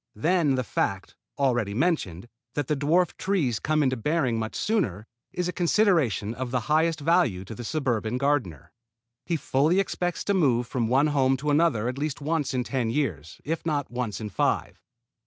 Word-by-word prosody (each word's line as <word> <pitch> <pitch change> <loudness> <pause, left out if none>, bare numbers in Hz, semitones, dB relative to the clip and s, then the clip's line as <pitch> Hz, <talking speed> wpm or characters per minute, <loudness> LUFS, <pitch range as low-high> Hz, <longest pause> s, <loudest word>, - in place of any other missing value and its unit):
Then 155 - +2
the 130 - -1
fact, 100 -3 -2 0.2
already 120 -7 +1
mentioned, 120 - -1 0.3
that 145 - -1
the 150 - +1
dwarf 155 +5 +2
trees 160 - 0
come 155 0 +1
into 130 -1 +1
bearing 130 -2 0
much 110 0 -4
sooner, 130 - -1 0.3
is 180 -1 -2
a 180 - -3
consideration 165 - +2
of 125 +1 -4
the 125 0 0
highest 160 +5 +1
value 145 - +2
to 110 - -8
the 120 - -7
suburban 120 -4 -1
gardener. 125 - -1 0.6
He 170 - +1
fully 150 +6 +2
expects 180 -2 -2
to 200 - 0
move 130 -10 +2
from 115 -1 -1
one 135 +5 +3
home 135 -1 +3
to 150 +2 -1
another 145 -8 +2
at 125 +2 -3
least 150 -1 -2
once 150 0 -1
in 125 -1 -1
ten 125 -3 -1
years, 110 - -3
if 160 +3 -2
not 145 -5 -2
once 120 -5 -3
in 110 -2 -5
five. 80 - -1
135 Hz, 180 wpm, -26 LUFS, 115-160 Hz, 0.6 s, one